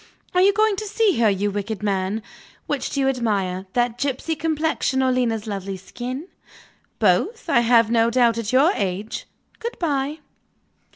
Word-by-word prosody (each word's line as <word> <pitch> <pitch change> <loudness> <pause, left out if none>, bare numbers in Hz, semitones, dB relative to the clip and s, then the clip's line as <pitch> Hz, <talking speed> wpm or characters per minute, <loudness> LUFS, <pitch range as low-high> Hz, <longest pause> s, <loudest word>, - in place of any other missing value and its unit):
Are 360 - +4
you 395 +2 +6
going 430 0 +2
to 430 - -4
see 420 - +2
her, 225 -2 +5
you 200 +1 0
wicked 205 +1 -4
man? 200 +1 -1 0.4
Which - - -2
do 280 - -1
you 270 - +2
admire 200 -7 -1
that 240 -1 0
gypsy 280 +4 -1
complexion, 310 -3 0
or 260 - +3
Lena's 235 -4 0
lovely 195 -2 -4
skin? 250 - -6 0.7
Both, 455 -2 +1
I 325 - +4
have 230 -1 +4
no 230 0 +4
doubt, 235 -1 +3
at 225 -1 -3
your 275 +7 +5
age. 195 - -3 0.3
Good 470 +1 -5
bye." 290 -2 -1
240 Hz, 165 wpm, -22 LUFS, 210-300 Hz, 0.7 s, you